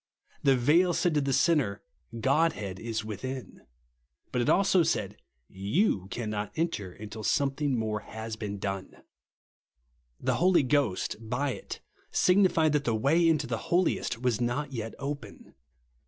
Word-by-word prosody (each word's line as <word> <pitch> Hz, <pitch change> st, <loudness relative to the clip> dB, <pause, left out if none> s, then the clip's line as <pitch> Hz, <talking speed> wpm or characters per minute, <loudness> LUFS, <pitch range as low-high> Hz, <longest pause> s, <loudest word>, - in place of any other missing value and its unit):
The 135 Hz, -1 st, +4 dB
veil 170 Hz, +8 st, +4 dB
said 175 Hz, 0 st, +1 dB
to 150 Hz, -, +2 dB
the 140 Hz, 0 st, -1 dB
sinner, 135 Hz, -9 st, +2 dB, 0.4 s
Godhead 115 Hz, -, +1 dB
is 115 Hz, -2 st, -3 dB
within; 130 Hz, +5 st, -6 dB, 0.7 s
but 125 Hz, -, 0 dB
it 120 Hz, -, +1 dB
also 195 Hz, -2 st, +4 dB
said, -, -, 0 dB, 0.3 s
You 100 Hz, -, 0 dB
cannot 105 Hz, -3 st, -3 dB
enter 130 Hz, -, -2 dB
till 110 Hz, +1 st, -8 dB
some 135 Hz, +5 st, +1 dB
thing 140 Hz, -2 st, -1 dB
more 110 Hz, -1 st, -1 dB
has 110 Hz, +1 st, -7 dB
been 105 Hz, -2 st, -5 dB
done. 95 Hz, -1 st, -5 dB, 1.2 s
The -, -, 0 dB
Holy 175 Hz, -3 st, +4 dB
Ghost, 135 Hz, -8 st, 0 dB
by 125 Hz, +5 st, -2 dB
it, -, -, -7 dB, 0.3 s
signified 180 Hz, -5 st, +3 dB
that 145 Hz, -1 st, +2 dB
the 115 Hz, -, +1 dB
way 160 Hz, +9 st, +3 dB
into 155 Hz, -3 st, +2 dB
the 120 Hz, -2 st, -3 dB
Hohest 175 Hz, -8 st, +1 dB
was 125 Hz, -2 st, 0 dB
not 125 Hz, +4 st, -1 dB
yet 115 Hz, -2 st, -5 dB
open. 140 Hz, +1 st, -7 dB
130 Hz, 145 wpm, -29 LUFS, 110-155 Hz, 1.2 s, The